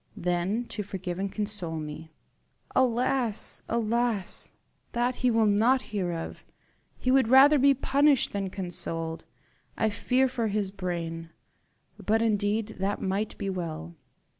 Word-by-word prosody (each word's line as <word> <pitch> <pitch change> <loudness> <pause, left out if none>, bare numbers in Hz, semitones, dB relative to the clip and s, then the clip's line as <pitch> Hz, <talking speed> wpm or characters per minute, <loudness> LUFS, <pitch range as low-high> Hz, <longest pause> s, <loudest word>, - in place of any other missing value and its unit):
"Then 180 +7 -1
to 210 - -3
forgive 190 -3 -5
and 195 0 -2
console 205 -6 -3
me." 155 +1 -7 0.6
"Alas! 245 -2 +1
alas! 230 -3 0 0.4
that 240 +1 0
he 250 - +2
will 225 -1 +3
not 225 +6 +3
hear 185 -4 -1
of. 165 -1 -6 0.5
He 255 - 0
would 265 -3 +4
rather 275 +4 +7
be 275 +1 +5
punished 275 +1 +3
than 200 -1 -2
consoled. 165 -3 -3 0.5
I 220 -1 +1
fear 250 +5 +2
for 235 -3 -1
his 205 -2 -1
brain. 170 -4 -4 0.7
But 220 +2 +2
indeed 215 0 0
that 195 +2 -1
might 195 +3 -2
be 200 - -4
well." 155 - -5
205 Hz, 135 wpm, -28 LUFS, 180-240 Hz, 0.7 s, rather